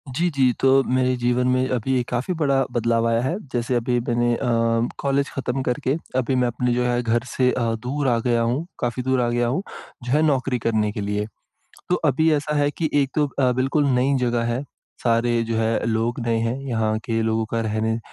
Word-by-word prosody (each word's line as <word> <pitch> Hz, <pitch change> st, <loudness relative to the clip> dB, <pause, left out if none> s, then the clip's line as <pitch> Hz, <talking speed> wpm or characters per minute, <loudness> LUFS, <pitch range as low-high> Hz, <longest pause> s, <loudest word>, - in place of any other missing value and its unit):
जी, 175 Hz, +3 st, +1 dB
जी। 135 Hz, -4 st, +2 dB
तो 135 Hz, 0 st, +5 dB
मेरे 130 Hz, 0 st, +1 dB
जीवन 125 Hz, +1 st, +1 dB
में 130 Hz, 0 st, +2 dB
अभी 125 Hz, +1 st, 0 dB
एक 120 Hz, -, -3 dB
काफ़ी 125 Hz, +9 st, -1 dB
बड़ा 135 Hz, -2 st, +3 dB
बदलाव 115 Hz, -1 st, +1 dB
आया 115 Hz, 0 st, +2 dB
है, 135 Hz, +8 st, -1 dB, 0.2 s
जैसे 120 Hz, +1 st, 0 dB
अभी 120 Hz, +1 st, +1 dB
मैंने 120 Hz, 0 st, +1 dB
अ, -, -, -6 dB, 0.6 s
कॉलेज 140 Hz, 0 st, 0 dB
ख़त्म 135 Hz, 0 st, -3 dB
करके, 135 Hz, +2 st, 0 dB, 0.2 s
अभी 130 Hz, +1 st, +1 dB
मैं 125 Hz, -1 st, +2 dB
अपने 120 Hz, +1 st, -1 dB
जो 125 Hz, 0 st, +1 dB
है 120 Hz, 0 st, +1 dB
घर 115 Hz, 0 st, 0 dB
से 125 Hz, 0 st, +1 dB
अ, 120 Hz, -, -1 dB, 0.2 s
दूर 140 Hz, +2 st, -1 dB
आ 120 Hz, -2 st, +3 dB
गया 120 Hz, -1 st, +2 dB
हूँ, 125 Hz, +8 st, 0 dB
काफ़ी 120 Hz, +1 st, -2 dB
दूर 130 Hz, -1 st, +1 dB
आ 120 Hz, -, +1 dB
गया 120 Hz, 0 st, +1 dB
हूँ, 135 Hz, +10 st, 0 dB, 0.4 s
जो 125 Hz, -, -4 dB
है 150 Hz, +2 st, +3 dB
नौकरी 130 Hz, -3 st, 0 dB
करने 110 Hz, -2 st, +1 dB
के 105 Hz, -, -5 dB
लिए। 105 Hz, +1 st, -2 dB, 0.7 s
तो 180 Hz, -, +4 dB
अभी 155 Hz, +3 st, +3 dB
ऐसा 150 Hz, +1 st, -1 dB
है 145 Hz, 0 st, +2 dB
कि 155 Hz, 0 st, -2 dB
एक 140 Hz, -2 st, +2 dB
तो 150 Hz, -1 st, +2 dB
अ, 130 Hz, -2 st, 0 dB
बिल्कुल 135 Hz, +4 st, +1 dB
नई 135 Hz, +3 st, +2 dB
जगह 120 Hz, -1 st, 0 dB
है, 130 Hz, -, -2 dB, 0.4 s
सारे 115 Hz, 0 st, +2 dB
जो 115 Hz, -, 0 dB
है 115 Hz, 0 st, 0 dB
लोग 115 Hz, +2 st, -1 dB
नए 115 Hz, -1 st, +1 dB
हैं, 115 Hz, +3 st, -1 dB
यहाँ 110 Hz, -2 st, 0 dB
के 115 Hz, -1 st, -1 dB
लोगों 110 Hz, 0 st, 0 dB
का 115 Hz, -, 0 dB
रहने 110 Hz, +1 st, -1 dB
125 Hz, 220 wpm, -22 LUFS, 115-135 Hz, 0.7 s, तो